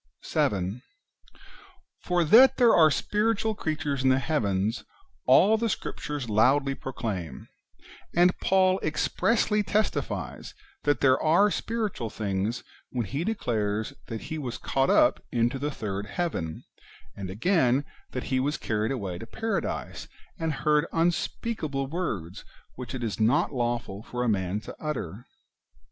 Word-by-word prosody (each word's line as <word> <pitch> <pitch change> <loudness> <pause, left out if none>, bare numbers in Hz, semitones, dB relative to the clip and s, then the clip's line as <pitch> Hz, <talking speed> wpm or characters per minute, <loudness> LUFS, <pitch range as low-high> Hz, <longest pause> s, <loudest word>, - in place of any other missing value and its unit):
7. 100 +4 0 1.2
For 175 -1 +2
that 235 - +7
there 240 -3 +6
are 160 -2 +7
spiritual 215 +7 0
creatures 150 -7 -2
in 130 - +3
the 130 - +4
heavens, 110 -7 0 0.4
all 220 +3 +6
the 230 +1 0
Scriptures 145 - -4
loudly 135 +6 +3
proclaim; 95 - -5 0.7
and 175 +1 +5
Paul 185 0 +3
expressly 210 +7 +1
testifies 205 +2 -2 0.3
that 145 -4 +2
there 130 -1 +4
are 185 +7 +4
spiritual 215 - -2
things 100 +2 -2 0.3
when 120 -3 -2
he 140 - -3
declares 110 - -1
that 115 -1 -5
he 160 - -5
was 125 -5 -4
caught 135 0 0
up - - +4
into 120 +3 +1
the 145 +2 -1
third 105 -6 -4
heaven,^ 110 - -3 0.5
and 95 -2 -6
again, 130 - +2 0.2
that 125 - -4
he 130 - +3
was 145 +3 0
carried 110 +1 -1
away 100 -9 -4
to 115 - -8
paradise, 225 - -3 0.3
and 160 -1 0
heard 150 +1 +3
unspeakable 165 - -1
words 135 - -4 0.3
which 125 +1 -7
it 125 - -4
is 110 -2 -3
not 110 +6 +2
lawful 120 -5 -2
for 120 +2 -4
a - - 0
man 100 -1 0
to - - -9
utter. 120 - -5
135 Hz, 135 wpm, -27 LUFS, 110-170 Hz, 1.2 s, that